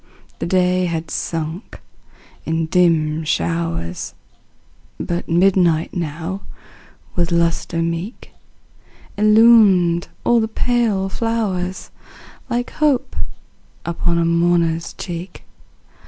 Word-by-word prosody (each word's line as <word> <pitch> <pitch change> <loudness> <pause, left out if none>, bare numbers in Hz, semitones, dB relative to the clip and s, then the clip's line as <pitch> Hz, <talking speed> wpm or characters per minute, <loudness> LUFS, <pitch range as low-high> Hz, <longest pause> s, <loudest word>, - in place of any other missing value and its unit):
The - - -2
day 180 0 +2
had 165 -1 -4
sunk 165 +4 -4 0.6
in 160 0 -1
dim 160 -2 +2
showers, 85 - -2 0.8
But 175 0 -3
midnight 175 -2 +3
now, 170 +3 -4 0.7
with 175 -1 0
lustre 170 0 +1
meet. 170 +7 -4 0.9
Illumined 210 -5 +5 0.2
all 240 -1 +4
the 220 - 0
pale 225 -4 0
flowers, 195 -4 -2 0.6
Like 245 0 -2
hope 280 -4 +1 0.7
upon 170 0 0
a 170 - +2
mourner's 170 -1 +1
cheek. 175 0 -7
175 Hz, 90 wpm, -20 LUFS, 165-195 Hz, 0.9 s, Illumined